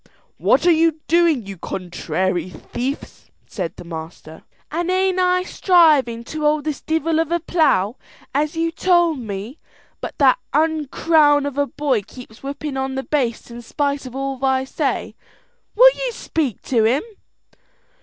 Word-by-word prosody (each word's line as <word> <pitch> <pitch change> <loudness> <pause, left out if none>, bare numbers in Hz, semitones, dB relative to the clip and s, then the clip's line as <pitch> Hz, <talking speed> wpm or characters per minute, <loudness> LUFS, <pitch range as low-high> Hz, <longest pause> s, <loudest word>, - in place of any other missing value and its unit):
"What 270 +5 +3
are 350 - +6
you 325 -1 +2
doing, 330 -8 +3
you 195 -3 -8
contrary 185 0 -3
thief?" 255 +9 -6 0.2
said 180 -5 -5
the - - -10
master. 160 -1 -9 0.3
"An' 340 +3 -2
ain't 375 0 +1
I 365 0 +2
strivin' 305 -12 +3
to 310 +6 -6
hold 300 0 +2
this 305 -2 -3
divel 320 0 0
of 325 0 -1
a 345 - +2
plough, 285 - +1 0.4
as 300 +3 -1
you 330 0 0
told 345 -3 +2
me; 215 +4 -6 0.4
but - - -6
that 270 -3 +4 0.2
ounkrawn 305 -1 +3
of 285 0 -3
a 285 - +2
boy 275 -7 0
keeps 225 +2 -13
whipping 280 0 -5
on 265 0 -2
the 265 - -3
bastes 245 -6 -2
in 235 0 -8
spite 280 +2 -2
of 255 - -10
all 270 -1 -4
I 265 -1 +2
say; 265 - -2 0.6
will - - +8
you - - -3
speak 290 - -3
to 235 -4 +1
him?" 255 +6 +2
285 Hz, 155 wpm, -20 LUFS, 240-325 Hz, 0.6 s, will